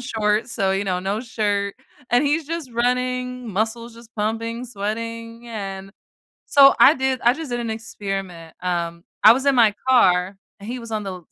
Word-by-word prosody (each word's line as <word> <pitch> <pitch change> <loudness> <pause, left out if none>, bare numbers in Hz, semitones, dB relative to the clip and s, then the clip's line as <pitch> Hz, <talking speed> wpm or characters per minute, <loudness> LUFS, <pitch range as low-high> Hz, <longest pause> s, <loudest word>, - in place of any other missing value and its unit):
shorts, 220 -1 -1
so, 195 -1 0
you 195 +1 -1
know, 180 -2 -1
no 195 +3 -2
shirt. 205 -4 -1 0.4
And 245 +4 +4
he's 295 +1 0
just 330 -5 -5
running, 250 +1 -1
muscles 225 +3 -2
just 230 -1 -16
pumping, 230 +3 -2
sweating, 230 +1 -5
and 195 -3 -6 0.5
so, 275 -1 +7
I 295 - +8
did 265 -1 -1
I 240 +1 +5
just 320 -3 -7
did 240 0 -2
an 230 -1 -3
experiment, 195 -6 -6
um, 170 -1 -2 0.2
I 220 - +11
was 265 +3 -2
in 275 - +4
my 220 -3 +5
car, 190 -6 +3 0.2
and 205 - -9
he 250 +1 -4
was 230 -1 -9
on 215 -1 -1
the 195 - -4
l 180 - -7
225 Hz, 185 wpm, -22 LUFS, 200-245 Hz, 0.5 s, I